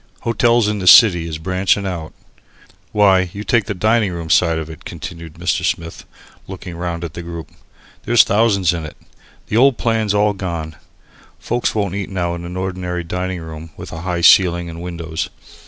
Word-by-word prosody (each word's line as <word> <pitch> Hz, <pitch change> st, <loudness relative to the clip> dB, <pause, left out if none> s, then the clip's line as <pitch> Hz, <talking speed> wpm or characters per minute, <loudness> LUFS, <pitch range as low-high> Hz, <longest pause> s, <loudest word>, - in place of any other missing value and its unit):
Hotels 115 Hz, -1 st, +2 dB
in 105 Hz, -1 st, -1 dB
the 90 Hz, -, -3 dB
city 90 Hz, -6 st, +7 dB
is 80 Hz, -1 st, -4 dB
branching 95 Hz, +4 st, 0 dB
out. 85 Hz, -5 st, -4 dB, 0.8 s
Why, 95 Hz, -3 st, +3 dB
you 100 Hz, -, -6 dB
take 115 Hz, -1 st, +2 dB
the 105 Hz, -1 st, -4 dB
dining 110 Hz, +1 st, +2 dB
room 85 Hz, -2 st, -5 dB
side 80 Hz, +1 st, +3 dB
of 80 Hz, -1 st, -4 dB
it," 80 Hz, -2 st, -11 dB
continued 85 Hz, -1 st, -8 dB
Mr. -, -, -1 dB
Smith, 85 Hz, 0 st, -3 dB, 0.4 s
looking 95 Hz, -2 st, -8 dB
round 85 Hz, 0 st, -4 dB
at 80 Hz, -3 st, -6 dB
the 85 Hz, -, -6 dB
group, 85 Hz, -1 st, -8 dB, 0.5 s
"there's 120 Hz, +1 st, +6 dB
thousands 100 Hz, -4 st, +2 dB
in 85 Hz, -2 st, -4 dB
it. 75 Hz, -, -9 dB, 0.5 s
The 110 Hz, -, -1 dB
old 130 Hz, 0 st, +5 dB
plan's 110 Hz, -3 st, 0 dB
all 105 Hz, 0 st, +3 dB
gone. 85 Hz, -5 st, -5 dB, 0.6 s
Folks 120 Hz, -1 st, -2 dB
won't 100 Hz, -4 st, -1 dB
eat 100 Hz, -1 st, -4 dB
now 90 Hz, -3 st, -2 dB
in 85 Hz, 0 st, -6 dB
an 90 Hz, +1 st, -6 dB
ordinary 90 Hz, -2 st, -3 dB
dining 90 Hz, +1 st, -4 dB
room 80 Hz, 0 st, -9 dB
with -, -, -9 dB
a 80 Hz, -, -7 dB
high 85 Hz, -1 st, -2 dB
ceiling 85 Hz, -1 st, +5 dB
and 85 Hz, +1 st, -9 dB
windows. 85 Hz, -2 st, -4 dB
90 Hz, 185 wpm, -18 LUFS, 85-100 Hz, 0.8 s, city